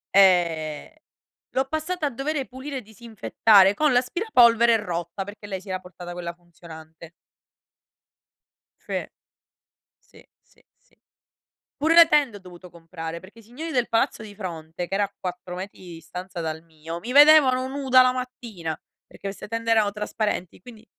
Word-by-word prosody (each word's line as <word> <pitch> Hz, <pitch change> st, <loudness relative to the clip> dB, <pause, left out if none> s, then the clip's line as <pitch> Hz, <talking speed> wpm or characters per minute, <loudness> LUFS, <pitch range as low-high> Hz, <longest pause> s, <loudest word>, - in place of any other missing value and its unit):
Eh, 170 Hz, -, +3 dB, 0.6 s
l'ho 265 Hz, -, +2 dB
passata 315 Hz, +4 st, -3 dB
a -, -, +1 dB
dovere, 275 Hz, +3 st, -3 dB
pulire 265 Hz, +2 st, -7 dB
e -, -, -5 dB
disinfettare 220 Hz, -2 st, +3 dB
con 300 Hz, +6 st, +2 dB
l'aspirapolvere 245 Hz, -, +4 dB
rotta, 175 Hz, -2 st, -4 dB
perché 205 Hz, +1 st, -11 dB
lei 190 Hz, -2 st, -4 dB
si 190 Hz, -, -14 dB
era 185 Hz, 0 st, -2 dB
portata 180 Hz, -1 st, -10 dB
quella 175 Hz, -1 st, -6 dB
funzionante. 165 Hz, -2 st, -14 dB, 1.7 s
Fe -, -, -5 dB, 0.9 s
sì, -, -, -21 dB, 0.2 s
sì, -, -, -29 dB
sì. -, -, -34 dB, 0.8 s
Pure 315 Hz, +3 st, +2 dB
le 335 Hz, -1 st, +9 dB
tende 280 Hz, -9 st, +2 dB
ho -, -, -14 dB
dovuto 180 Hz, -1 st, -13 dB
comprare 165 Hz, -1 st, -8 dB
perché 190 Hz, +6 st, -16 dB
i -, -, -16 dB
signori 275 Hz, +9 st, -7 dB
del 245 Hz, -5 st, +1 dB
palazzo 225 Hz, -1 st, 0 dB
di 205 Hz, -1 st, -11 dB
fronte, 170 Hz, -3 st, -6 dB
che -, -, -8 dB
era 205 Hz, -, +2 dB
a 200 Hz, -, -4 dB
4 180 Hz, 0 st, -6 dB
metri 190 Hz, +3 st, -8 dB
di 180 Hz, -2 st, -11 dB
distanza 180 Hz, +2 st, -8 dB
dal 160 Hz, 0 st, -4 dB
mio, 165 Hz, +1 st, -8 dB
mi 240 Hz, +8 st, -7 dB
vedevano 280 Hz, -3 st, +6 dB
nuda 265 Hz, -1 st, +4 dB
la 255 Hz, 0 st, +4 dB
mattina 230 Hz, -11 st, -6 dB, 0.3 s
perché -, -, -10 dB
queste 195 Hz, -, -7 dB
tende 230 Hz, +1 st, -2 dB
erano 215 Hz, -2 st, +3 dB
trasparenti, 210 Hz, -3 st, -3 dB
quindi 225 Hz, -1 st, -14 dB
205 Hz, 155 wpm, -24 LUFS, 175-255 Hz, 1.7 s, le